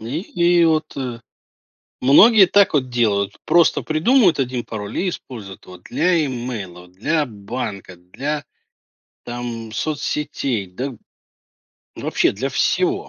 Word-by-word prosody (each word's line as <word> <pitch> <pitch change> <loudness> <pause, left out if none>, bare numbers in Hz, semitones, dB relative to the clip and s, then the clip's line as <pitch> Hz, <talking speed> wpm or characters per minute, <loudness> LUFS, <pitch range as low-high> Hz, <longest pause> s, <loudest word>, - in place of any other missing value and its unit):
И, 120 +7 -4
и 175 -2 +2
вот, 155 -1 0
э 125 -3 -4 0.8
Многие 195 - +7
так 200 -1 +4
вот 130 -3 +1
делают: 105 -4 0
просто 170 -1 +3
придумают 175 - +3
1 125 -2 -2
пароль 105 -1 -6
и 190 - 0
используют 110 - -9
его 90 0 -12
для 165 - +1
имейла, 110 -9 -6
для 145 - -1
банка, 105 -4 -6
для, 140 +12 -5 0.8
там, 120 -2 -6
соцсетей, 140 -4 -2
да, 125 +10 -5
б 120 - -13 1.0
вообще - - 0
для - - -3
всего. - - 0
125 Hz, 125 wpm, -20 LUFS, 105-155 Hz, 1.0 s, Многие